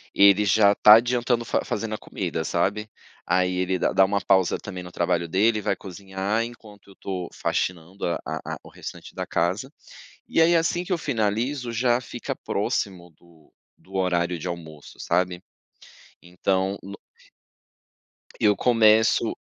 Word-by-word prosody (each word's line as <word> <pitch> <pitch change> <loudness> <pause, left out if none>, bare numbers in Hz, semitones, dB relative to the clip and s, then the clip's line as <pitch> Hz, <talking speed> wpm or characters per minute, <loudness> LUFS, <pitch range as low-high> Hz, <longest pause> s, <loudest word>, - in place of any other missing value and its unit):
Ele 100 +1 +6
já 100 0 +5
tá 105 - +8
adiantando 120 0 0
fa - - -1
fazendo 110 0 -3
a - - -6
comida, 85 -6 -4
sabe 100 +5 -1 0.4
aí 90 +1 +1
ele 95 0 0
dá - - 0
dá 95 - +5
uma 100 +1 -1
pausa 95 -2 +2
também 95 -3 -8
no 90 0 -10
trabalho 85 -1 0
dele 105 +6 +2
e - - -6
vai - - 0
cozinhar 95 +2 -3
enquanto 110 -4 -11
eu - - -14
estou 95 -2 -5
faxinando 90 +2 -3
a 85 - 0
a - - -4
a - - -5
o - - -13
restante - - -10
da - - -4
casa. 95 +9 -1 0.6
E - - +2
aí, 170 +1 +5
assim 170 +1 +1
que 185 - -1
eu - - +1
finalizo, 120 0 -1
já 120 +1 +2
fica 120 -1 -6
próximo 90 -3 -3
do 85 -3 -23 0.3
do 95 - -20
horário 90 -2 0
de 90 - -5
almoço, 80 -4 -8
sabe? 90 +1 0 0.8
Então 95 +2 -1
no 100 +1 -9 1.4
Eu 105 -1 +3
começo 110 -1 +3
100 Hz, 160 wpm, -24 LUFS, 90-110 Hz, 1.4 s, tá